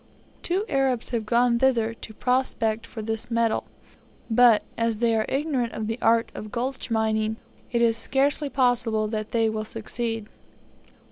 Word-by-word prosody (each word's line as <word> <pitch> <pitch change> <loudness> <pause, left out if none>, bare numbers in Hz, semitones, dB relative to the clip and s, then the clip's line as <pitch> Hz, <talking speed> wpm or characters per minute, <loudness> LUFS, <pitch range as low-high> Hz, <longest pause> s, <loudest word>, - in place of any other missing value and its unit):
Two 375 +4 -1
Arabs 265 -3 0
have 225 -3 -2
gone 235 0 +3
thither 235 -4 +2
to 220 -1 -10
prospect 230 -3 0
for 220 -2 -7
this 220 +1 -3
metal; 230 -1 +1 0.7
but, 235 -1 +6
as 230 -1 0
they 230 0 +2
are 220 -1 0
ignorant 270 -5 -1
of 220 - -3
the 225 +3 -3
art 230 0 +3
of 215 0 -8
gulch 255 +3 -3
mining, 220 -1 +1 0.4
it 235 -1 +2
is 230 -1 +3
scarcely 280 +4 +1
possible 240 -5 +1
that 215 0 -3
they 225 -1 +2
will 220 0 -2
succeed. 225 0 -3
230 Hz, 155 wpm, -25 LUFS, 220-250 Hz, 0.7 s, but